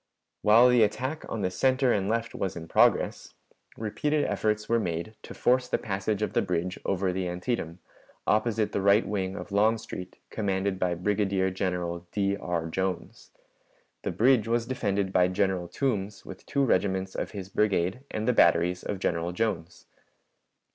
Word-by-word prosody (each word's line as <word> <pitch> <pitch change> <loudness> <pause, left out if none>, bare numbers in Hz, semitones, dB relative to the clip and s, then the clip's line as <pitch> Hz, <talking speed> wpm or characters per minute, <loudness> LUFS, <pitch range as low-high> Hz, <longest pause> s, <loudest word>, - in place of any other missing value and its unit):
While 115 +4 +6
the 125 -1 +5
attack 130 +8 0
on 110 - -3
the 90 - 0
center 130 +3 +2
and 100 -1 0
left 115 +1 -1
was 95 - -3
in 80 -1 -7
progress, - - +2 0.4
repeated 145 +7 0
efforts 105 0 -1
were 115 0 +2
made 85 +1 -3
to - - -10
force 125 +1 +2
the - - +1
passage 100 +1 -2
of - - -2
the - - +3
bridge 90 +1 -2
over 95 -1 0
the 95 0 -2
Antietam, 90 -1 -3 0.5
opposite 110 0 +1
the 100 - -1
right 100 +3 +4
wing 95 -2 -2
of 100 - -7
Longstreet, 105 -3 0
commanded 95 -2 -1
by 90 -2 +1
Brigadier 95 0 0
General 90 -2 -3
D. 100 -1 0
R. 85 -4 -3
Jones. 95 +2 -4 0.7
The - - -3
bridge 120 -2 +3
was 115 0 +1
defended 100 -6 -1
by 90 -1 +4
General 95 -1 0
Toombs 105 -5 -2
with 95 - -11
two 140 -1 +1
regiments 95 -3 0
of - - -3
his 95 -2 -7
brigade 100 0 +1
and 110 +2 -3
the 125 - +4
batteries 90 -2 +3
of 100 - -4
General 85 -2 -1
Jones. 90 -5 -3
100 Hz, 165 wpm, -27 LUFS, 90-110 Hz, 0.7 s, While